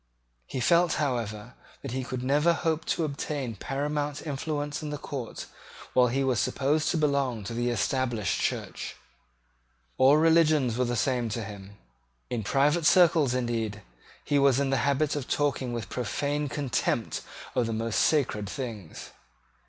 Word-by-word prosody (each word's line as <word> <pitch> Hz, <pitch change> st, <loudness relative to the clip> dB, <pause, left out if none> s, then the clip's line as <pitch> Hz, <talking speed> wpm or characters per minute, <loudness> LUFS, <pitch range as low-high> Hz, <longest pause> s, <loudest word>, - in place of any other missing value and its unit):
He 130 Hz, -, -4 dB
felt, 170 Hz, +5 st, +4 dB
however, 120 Hz, -5 st, -2 dB, 0.3 s
that 135 Hz, -, -5 dB
he 130 Hz, +1 st, -2 dB
could 125 Hz, 0 st, -4 dB
never 150 Hz, +6 st, +3 dB
hope 160 Hz, -1 st, -1 dB
to 165 Hz, -, 0 dB
obtain 140 Hz, -4 st, -3 dB
paramount 145 Hz, -, -3 dB
influence 145 Hz, 0 st, -3 dB
in 155 Hz, -, -4 dB
the 150 Hz, -, -3 dB
court 135 Hz, -5 st, -6 dB, 0.5 s
while 125 Hz, -1 st, +5 dB
he 135 Hz, +3 st, 0 dB
was 130 Hz, -5 st, +1 dB
supposed 145 Hz, +3 st, +1 dB
to 170 Hz, -, +1 dB
belong 140 Hz, -7 st, +1 dB
to 105 Hz, -, -5 dB
the 120 Hz, +1 st, 0 dB
Established 120 Hz, -1 st, 0 dB
Church. -, -, -3 dB, 1.0 s
All 135 Hz, +3 st, +7 dB
religions 155 Hz, -6 st, +4 dB
were 125 Hz, +1 st, +1 dB
the 120 Hz, 0 st, -1 dB
same 120 Hz, -1 st, 0 dB
to 115 Hz, +1 st, -3 dB
him. 100 Hz, -1 st, -10 dB, 0.5 s
In 120 Hz, -2 st, -1 dB
private 150 Hz, +8 st, +2 dB
circles, 160 Hz, -8 st, +5 dB
indeed, 115 Hz, -4 st, -2 dB, 0.4 s
he 145 Hz, -, +2 dB
was 140 Hz, -2 st, +4 dB
in 140 Hz, -1 st, 0 dB
the 135 Hz, -, +2 dB
habit 140 Hz, +3 st, +1 dB
of 145 Hz, -3 st, -4 dB
talking 140 Hz, -4 st, 0 dB
with 115 Hz, -3 st, -4 dB
profane 145 Hz, +4 st, -2 dB
contempt 120 Hz, -4 st, -1 dB, 0.3 s
of 125 Hz, -3 st, +1 dB
the 115 Hz, -, -2 dB
most 115 Hz, 0 st, -1 dB
sacred 115 Hz, -10 st, +1 dB
things. 110 Hz, -, -7 dB
135 Hz, 155 wpm, -28 LUFS, 120-145 Hz, 1.0 s, All